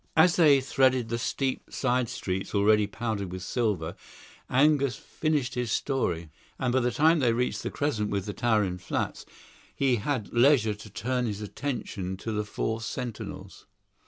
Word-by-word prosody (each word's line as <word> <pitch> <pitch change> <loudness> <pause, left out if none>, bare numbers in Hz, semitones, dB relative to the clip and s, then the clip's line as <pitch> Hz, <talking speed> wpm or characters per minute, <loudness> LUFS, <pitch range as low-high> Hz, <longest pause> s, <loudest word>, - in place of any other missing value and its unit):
As 165 +1 +6
they 145 -5 +6
threaded 130 -3 +2
the 115 0 -1
steep 130 +2 -2
side 125 -2 0
streets 95 +2 -3
already 105 +1 +4
powdered 100 -2 -3
with 95 0 -6
silver, 95 -8 -1 0.5
Angus 140 -1 +3
finished 145 +2 -1
his 125 -2 -2
story; 85 - -1 0.3
and 125 -2 0
by 130 - +4
the 125 -1 +1
time 160 +3 +4
they 120 -4 +3
reached 125 +2 -1
the - - -3
crescent 115 -8 -1
with 100 -2 -2
the 105 - -4
towering 105 -6 +1
flats, 90 - -3 0.5
he 130 -3 +2
had 115 -1 -2
leisure 120 -3 +4
to 105 +1 -11
turn 125 +4 -1
his 105 -2 -3
attention 105 -5 -4
to 110 - -5
the 105 -1 -1
four 110 +2 -2
sentinels. 105 -5 -6
115 Hz, 160 wpm, -28 LUFS, 105-130 Hz, 0.5 s, As